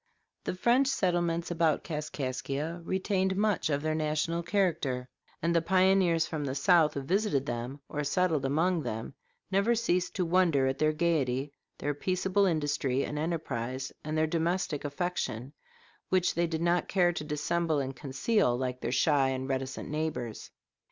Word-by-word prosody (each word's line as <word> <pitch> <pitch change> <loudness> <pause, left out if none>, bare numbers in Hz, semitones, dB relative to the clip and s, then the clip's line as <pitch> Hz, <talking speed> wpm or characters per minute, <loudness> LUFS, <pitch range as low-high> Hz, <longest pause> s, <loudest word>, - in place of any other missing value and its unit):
The - - -2
French 245 +8 +3
settlements 175 -9 0
about 165 -3 +2
Kaskaskia 150 +1 -3
retained 190 +1 0
much 205 -4 +1
of 145 0 0
their 155 0 0
national 155 +2 0
character, 170 -9 0 0.4
and 170 +1 +2
the 170 - +4
pioneers 185 -2 +3
from 155 -2 -4
the 135 -1 -3
South 155 +2 +4
who 140 - -2
visited 185 -4 +1
them 120 +3 -4
or 150 - -3
settled 160 0 +1
among 165 +6 +1
them 115 -1 -5 0.4
never 200 +5 +3
ceased 180 -6 0
to 185 - 0
wonder 165 -6 +3
at 130 +1 -1
their 155 0 +3
gayety, 145 -4 0 0.2
their 145 +1 -1
peaceable 185 +5 +1
industry 145 -5 0
and 150 - -4
enterprise, 135 -6 -3
and 155 +1 -2
their 155 - +3
domestic 165 -1 -1
affection, 145 -5 -3 0.6
which 185 -1 +2
they 170 0 +1
did 160 0 -2
not 175 +1 +2
care 175 -2 +3
to 160 - -4
dissemble 155 +2 0
and 135 -1 -2
conceal 135 - +1
like 125 0 -3
their 120 - -2
shy 135 +1 +3
and 130 0 -3
reticent 135 -1 -3
neighbors. 150 -7 -3
155 Hz, 160 wpm, -30 LUFS, 140-180 Hz, 0.6 s, the